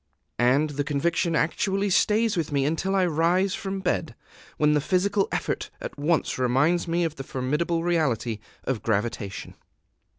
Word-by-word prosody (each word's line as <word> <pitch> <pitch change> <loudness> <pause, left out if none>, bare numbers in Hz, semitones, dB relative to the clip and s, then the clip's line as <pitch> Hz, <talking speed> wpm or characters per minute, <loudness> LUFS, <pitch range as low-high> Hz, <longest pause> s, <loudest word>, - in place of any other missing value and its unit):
And 135 +5 +3
the 145 0 -2
conviction 165 +4 0
actually 195 +5 0
stays 215 +3 +3
with 160 -3 -2
me 140 -1 +1
until 170 +6 0
I 190 -1 +3
rise 175 +4 +2
from 195 0 -4
bed, - - -1 0.4
when 150 0 +3
the 150 - +2
physical 195 +5 +1
effort - - -2
at - - -6
once 155 -2 0
reminds 140 +8 +2
me 170 +1 +1
of 160 -2 -2
the 135 - -5
formidable 150 +7 -1
reality 135 -10 0 0.2
of 130 -5 -2
gravitation. 105 -2 -2
160 Hz, 155 wpm, -25 LUFS, 140-180 Hz, 0.4 s, And